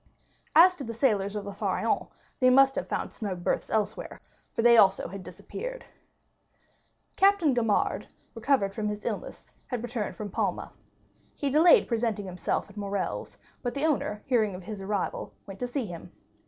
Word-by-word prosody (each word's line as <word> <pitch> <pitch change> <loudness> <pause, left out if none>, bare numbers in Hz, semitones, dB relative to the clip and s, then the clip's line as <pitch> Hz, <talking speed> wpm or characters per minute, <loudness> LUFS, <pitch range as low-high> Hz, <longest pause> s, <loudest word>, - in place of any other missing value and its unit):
As 355 +4 +8
to 280 - -6
the 230 -2 -6
sailors 210 -5 +1
of 205 -1 -4
the 200 - -6
Pharaon, 200 - -1 0.3
they 255 - +5
must 270 +1 +6
have - - -3
found - - -3
snug 190 -6 -5
berths - - -1
elsewhere, 215 -2 -2 0.3
for 230 - -1
they 235 0 +7
also 200 -4 +5
had 195 +2 -7
disappeared. - - -7 1.3
Captain 390 -7 +4
Gaumard, 225 -4 +1 0.3
recovered 230 -4 +1
from 210 0 -2
his 210 0 -4
illness, - - -5
had 245 -3 -3
returned 235 -3 -3
from 210 -2 -6
Palma. - - -2 0.6
He 280 -2 -1
delayed 320 +5 +6
presenting 225 -3 -1
himself 180 -1 -2
at 205 0 -16
Morrel's, 200 -1 -3 0.2
but 245 0 -3
the 280 +2 0
owner, 245 -9 -1
hearing 220 -7 +1
of 180 - -9
his 210 0 -7
arrival, 200 0 -3
went 195 -1 -10
to 250 - -2
see 245 0 -2
him. 175 -4 -9
225 Hz, 170 wpm, -28 LUFS, 200-270 Hz, 1.3 s, As